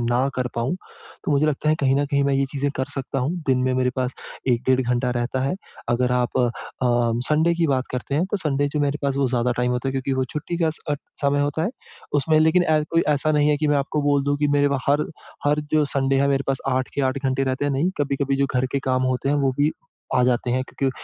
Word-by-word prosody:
ना 120 +3 +1
कर 125 -1 -1
पाऊँ। 120 +8 -1 0.5
तो - - 0
मुझे 145 +2 +3
लगता 150 0 0
है 155 - +4
कहीं 135 -1 +3
न 145 - +2
कहीं 140 -1 +2
मैं 140 - +2
ये 135 0 +2
चीज़ें 140 0 -1
कर 130 - 0
सकता 135 0 -3
हूँ, 130 +5 0
दिन 130 -2 +3
में 130 - +1
मेरे 125 0 +2
पास 130 0 -1 0.3
1 120 -1 +2
डेढ़ 130 0 +4
घंटा 125 0 0
रहता 120 +1 -1
है। 135 - 0 0.3
अगर 125 +1 +1
आप 125 0 0
अ, 120 -2 +3 0.8
संडे 160 +3 +3
की 170 -1 +1
बात 130 -3 0
करते 125 +2 -3
हैं 160 +5 +2
तो 210 - +1
संडे 145 -5 0
जो 150 - +1
मेरे 145 0 0
पास 140 -1 0
वो 140 -2 +2
ज़्यादा 125 0 +1
टाइम 125 0 +1
होता 125 +2 -1
है 135 - -1
क्योंकि 135 0 -2
वो 130 0 +1
छुट्टी 150 +6 -4
का 160 - +3
स 160 - -9
अ, - - +3 0.3
समय 140 0 +2
होता 145 +2 0
है। 190 - 0 0.4
उसमें 155 +2 +3
लेकिन 160 +3 +4
ए, 155 -2 +2
कोई 165 0 +3
ऐसा 150 +1 +2
नहीं 150 0 +3
है 150 - +3
कि 150 0 0
मैं 145 - +3
आपको 145 +2 -1
बोल 145 -1 +2
दूँ 145 0 +1
कि 145 0 +1
मेरे 145 0 +4
पा 140 - 0
हर 145 +2 +3 0.4
हर 145 +1 +2
जो 155 -1 +4
संडे 135 -1 +1
है, 140 - +3
मेरे 140 -1 +2
पास 135 -1 +1
8 130 0 0
के - - 0
8 130 +1 0
घंटे 130 +1 +1
रहते 130 +1 -1
हैं, 145 - +1
नहीं। 145 +7 +1
कभी-कभी 140 -1 0
जो 140 - +2
घर 125 +1 +2
के 140 - +1
काम 130 0 +2
होते 130 -1 -1
हैं 145 - +2
वो 140 -2 +2
भी 145 +2 +3 0.4
आ 125 - +4
जाते 125 0 +1
हैं 130 +1 +1
क्योंकि 135 -1 -1
140 Hz, 270 wpm, -23 LUFS, 130-145 Hz, 0.8 s, है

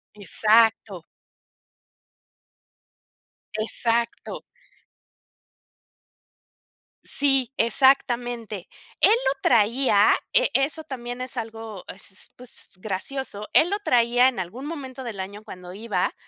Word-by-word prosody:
Exacto. 210 -3 +2 2.5
Exacto. 230 +1 -2 2.6
Sí, 270 -3 +2
exactamente. 240 -4 +1 0.3
Él - - +8
lo 280 - 0
traía, 225 -1 +3 0.2
e - - +4
eso 300 +3 0
también 245 -3 -7
es 255 +1 -6
algo 225 -3 -7
es 195 +1 -13
s 190 - -13
pues, 245 -6 -11
gracioso, 210 +1 -5
él 335 - +5
lo 405 - -1
traía 245 - +3
en 240 - -7
algún 230 +10 -6
momento 270 -4 -7
del 225 -5 -7
año 205 +3 -7
cuando 180 -4 -11
iba, 205 -3 -2
235 Hz, 95 wpm, -24 LUFS, 210-265 Hz, 2.6 s, Él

